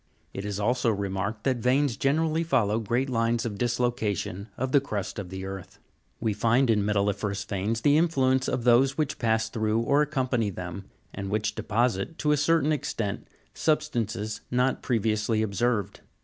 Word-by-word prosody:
It 95 - -5
is 100 -1 -3
also 120 +3 +1
remarked 100 +1 -2
that 130 -2 +1
veins 125 +2 +2
generally 160 +5 +1
follow 115 -9 +1
great 120 +5 0
lines 115 -2 0
of 105 -3 -4
dislocation 120 -5 -1
of 130 0 -2
the 140 - +5
crust 105 -7 -4
of 95 -3 -6
the 95 +1 -6
earth. 95 -2 -8 0.4
We 110 - 0
find 115 +4 +3
in 105 -2 +2
metalli'ferous 100 0 0
veins 105 +3 -2
the 145 +4 +4
influence 130 -6 +2
of 125 - -1
those 125 +3 +4
which 150 -2 -1
pass 110 -1 +1
through 110 0 0
or 140 +5 +3
accompany 130 -7 0
them, 90 0 -6 0.3
and 95 -1 -5
which 105 +1 -1
deposit, 110 +5 -1
to 150 - +1
a 150 - +3
certain 155 +1 +2
extent, 110 -8 -3 0.3
substances 110 -8 -1
not 125 +1 +1
previously 110 -1 0
observed. 105 -1 -1
115 Hz, 165 wpm, -27 LUFS, 105-130 Hz, 0.4 s, the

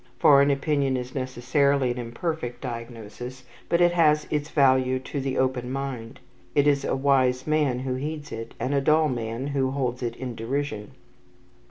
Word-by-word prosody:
Foreign 140 -1 +6
opinion 140 -1 +1
is 125 0 -6
necessarily 130 +1 +1
an 125 - -4
imperfect 120 +1 -4
diagnosis, 120 +1 -7 0.3
but 170 - +3
it 175 0 +5
has 150 -3 +3
its 150 0 -1
value 130 -2 +3
to 135 +2 -5
the 135 -1 -2
open 130 -1 0
mind. 135 -2 -5 0.4
He 145 - +6
is 140 -1 +2
a - - 0
wise 130 -2 +2
man 150 -5 +1
who 130 0 -3
heeds 150 +3 -5
it, 115 0 -7
and 135 - -1
a 140 - +2
dull 155 +2 +3
man 115 0 -3
who 140 -2 0
holds 130 -2 -2
it 120 -1 -3
in 125 -1 -5
derision. 115 -2 -3
130 Hz, 170 wpm, -25 LUFS, 125-145 Hz, 0.4 s, Foreign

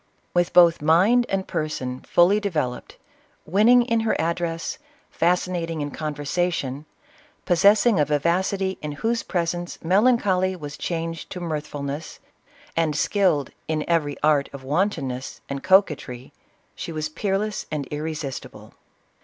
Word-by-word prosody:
With 175 -1 +2
both 170 -3 +6
mind 195 +11 +4
and 195 -1 -1
person 155 -6 -3
fully 180 +8 +3
developed, 150 -12 -3 0.5
winning 220 +8 +5
in 230 -1 +1
her 225 0 0
address, 165 - -2 0.3
fascinating 170 -1 0
in 145 -1 -3
conversation, 150 -1 -2 0.6
possessing 200 +3 +4
a 150 - +4
vivacity 185 +6 0
in 150 -1 -4
whose 230 +10 -1
presence 175 0 -3
melancholy 190 -1 +3
was 145 -4 -7
changed 165 -1 -4
to 180 - -6
mirthfulness, 150 -2 -5 0.6
and 160 -2 +1
skilled 165 -5 +1
" - - -41
in 155 -1 -2
every 155 -4 0
art 150 -2 +3
of 140 -1 -9
wanton 155 0 0
ness" 125 +1 -6
and 140 0 -4
coquetry, 150 -10 +1 0.4
she - - -6
was 155 -1 -3
peerless 200 +5 -2
and 150 -2 -2
irresistible. 150 -3 -6
165 Hz, 130 wpm, -23 LUFS, 150-190 Hz, 0.6 s, both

